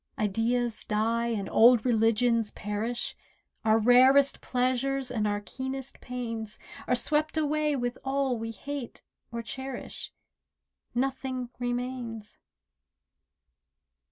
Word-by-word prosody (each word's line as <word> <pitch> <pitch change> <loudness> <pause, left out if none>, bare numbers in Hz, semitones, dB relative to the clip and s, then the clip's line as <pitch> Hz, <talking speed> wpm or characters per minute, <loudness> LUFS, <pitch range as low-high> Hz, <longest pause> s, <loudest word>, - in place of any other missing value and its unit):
Ideas 225 +3 0
die 225 +2 0
and 210 -5 -2
old 235 0 +6
religions 230 -1 +3
perish, 215 +3 -3 0.5
Our 220 0 +4
rarest 260 +5 +5
pleasures 255 +1 0
and 215 -3 0
our 205 0 -1
keenest 265 +6 -6
pains 230 -4 -5 0.3
Are 250 - +3
swept 305 +5 +1
away 300 -1 +1
with 245 -2 -2
all 270 -1 0
we 225 0 -4
hate 270 +3 -6 0.3
or 235 0 -4
cherish— 265 +2 -6 0.8
Nothing 260 -1 -2
remains. 245 -3 -4
245 Hz, 100 wpm, -28 LUFS, 225-265 Hz, 0.8 s, old